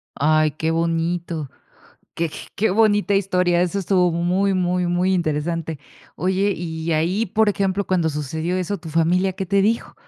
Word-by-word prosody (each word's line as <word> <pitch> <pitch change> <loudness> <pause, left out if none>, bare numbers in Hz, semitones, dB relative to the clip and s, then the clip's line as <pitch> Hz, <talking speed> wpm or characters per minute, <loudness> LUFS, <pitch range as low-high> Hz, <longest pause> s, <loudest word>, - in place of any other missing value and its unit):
Ay, 155 +1 +3
qué 160 +2 -2
bonito, 165 -2 -1 0.7
qué 165 -1 -1 0.3
qué 220 +1 +2
bonita 205 0 +3
historia, 180 -3 +2
eso 180 +2 -1
estuvo 180 -2 +2
muy, 180 +4 +1
muy, 180 -1 0
muy 180 +2 +1
interesante, 160 -1 -2 0.4
oye, 190 +4 +1
y 160 0 -3
ahí, 175 +8 +1
por 215 +3 +2
ejemplo, 195 0 0
cuando 175 -3 +1
sucedió 160 +4 -3
eso, 185 +2 -2
¿tu 165 -1 -10
familia 175 +4 +2
qué 190 +1 -5
te 200 +1 +2
dijo? 225 +3 0
175 Hz, 155 wpm, -21 LUFS, 165-190 Hz, 0.7 s, Ay